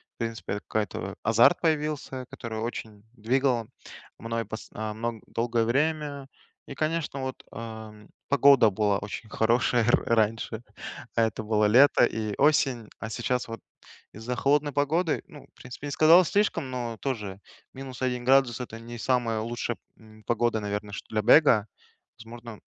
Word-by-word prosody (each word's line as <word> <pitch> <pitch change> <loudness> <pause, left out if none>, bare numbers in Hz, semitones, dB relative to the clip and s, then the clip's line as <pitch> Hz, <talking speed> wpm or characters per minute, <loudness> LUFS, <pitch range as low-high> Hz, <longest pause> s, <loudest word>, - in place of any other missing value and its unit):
в - - -82
принципе, 115 -3 -4
это 105 - -4
какой-то 105 -2 -3
азарт 115 - +5
появился, 150 -5 -1
который 110 -2 -6
очень 110 -2 -6
двигал 125 0 0 0.5
мной 115 0 -3
пс 110 +2 -8
а, 110 0 -4
мн 115 0 -4
долгое 115 0 0
время. 145 +2 -1 0.4
И, 140 - -8
конечно, 155 -2 -2
вот, 130 0 -5
эм, 110 -2 -9 0.2
погода 140 -4 +6
была 100 0 +1
очень 105 +2 -7
хорошая 120 +2 +2
р 120 - +3
раньше, 110 0 0 0.5
это 110 -1 +1
было 105 0 +2
лето 120 +4 +6
и 110 -3 -3
осень, 135 -6 +2
а 115 - -5
сейчас 120 +2 -2
вот 115 0 -7 0.6
из-за 115 +4 -4
холодной 145 +3 +2
погоды, 155 +4 0
ну, 145 - -13
в - - -25
принципе, 125 +3 -9
не - - -4
сказал 165 +5 +6
слишком, 200 -8 0
но 120 -3 -4
тоже 105 -8 -4 0.3
-1 130 -2 -4
градус- 130 -2 +4
это 115 -2 -7
не 120 +1 -9
самая 115 -3 0
лучшая, 120 +1 -3 0.2
м, 110 -1 -18
погода, 120 -1 +1
наверное, 105 0 -4
чт 105 - -7
для 110 -1 0
бега. 115 -3 +5 0.5
Возможно, 115 -1 -10
120 Hz, 150 wpm, -27 LUFS, 110-135 Hz, 0.6 s, погода